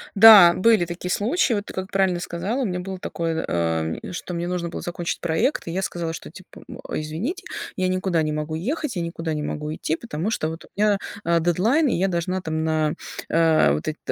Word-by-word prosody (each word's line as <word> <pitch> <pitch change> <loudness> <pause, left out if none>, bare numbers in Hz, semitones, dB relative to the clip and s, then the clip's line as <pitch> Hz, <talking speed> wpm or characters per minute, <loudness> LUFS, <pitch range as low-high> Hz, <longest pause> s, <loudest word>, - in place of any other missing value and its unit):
Да, 200 -4 +10
были 215 -1 +4
такие 175 +1 -5
случаи. 240 - +1
Вот, 205 -1 -2
ты - - -9
как 190 +1 -5
правильно 190 -2 +2
сказала, 180 +9 -3
у - - 0
меня 180 -3 -2
было 190 +1 -6
такое, 165 -2 -2
э, 80 - -1
что 180 0 -6
мне 170 0 -2
нужно 175 -1 -2
было - - -6
закончить 175 -1 -4
проект, 170 - 0
и - - -3
я 185 +3 -1
сказала, 170 -3 -3
что - - -8
типа, - - -14
м, - - -9
извините, 190 - -3 0.3
я 185 -1 0
никуда 185 -2 0
не 155 -1 -1
могу 150 +1 -3
ехать, 255 - -3
я 175 - -1
никуда 165 -1 -3
не 150 - -2
могу 150 +1 -4
идти. 155 - -2
Потому 185 0 -4
что, 155 -7 -1
вот, 165 +1 -8
у - - -19
меня, 210 0 +3 0.3
э, 170 0 +3
дедлайн, 205 - +2
и - - +1
я 185 +3 +1
должна 185 +1 -1
там 160 -2 -2
на, 155 -1 +1 0.4
э, 160 - +4
вот 75 - -3
эт 155 - -2
175 Hz, 220 wpm, -23 LUFS, 160-195 Hz, 0.4 s, Да